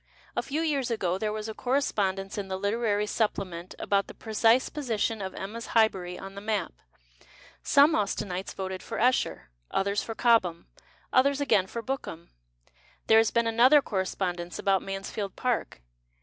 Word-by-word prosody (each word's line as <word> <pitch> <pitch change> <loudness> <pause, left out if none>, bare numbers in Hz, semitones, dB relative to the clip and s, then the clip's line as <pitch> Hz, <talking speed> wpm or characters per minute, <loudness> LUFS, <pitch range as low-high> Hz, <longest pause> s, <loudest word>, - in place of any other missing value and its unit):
A - - +1
few 295 +3 -2
years 285 -6 0
ago 190 -5 -1
there 215 0 -1
was 215 0 -4
a 220 - -5
correspondence 205 -7 -1
in 200 -2 -4
the 190 0 -3
Literary 210 +1 0
Supplement 185 -5 -2
about 200 -1 0
the - - -11
precise 225 +3 +3
position 225 -6 -2
of 190 -1 -5
Emma's 225 +4 -6
Highbury 185 -5 +2
on 195 0 -9
the 200 - -8
map. 210 - -2 0.9
Some 285 +3 +5
Austenites 195 -2 -2
voted 190 -1 -4
for - - -6
Esher, 240 - +1 0.2
others 200 +1 0
for 225 - -6
Cobham, 205 -9 +2 0.5
others 280 +2 +4
again 205 -10 +2
for 230 +3 -6
Bookham. 220 -10 -5 0.7
There 220 0 +6
has 225 0 +3
been 235 0 +1
another 250 +6 +5
corre 190 -3 -1
spondence 175 -2 -3
about 195 -1 +2
Mansfield 195 +1 -5
Park. 240 - -2
210 Hz, 160 wpm, -28 LUFS, 190-235 Hz, 0.9 s, There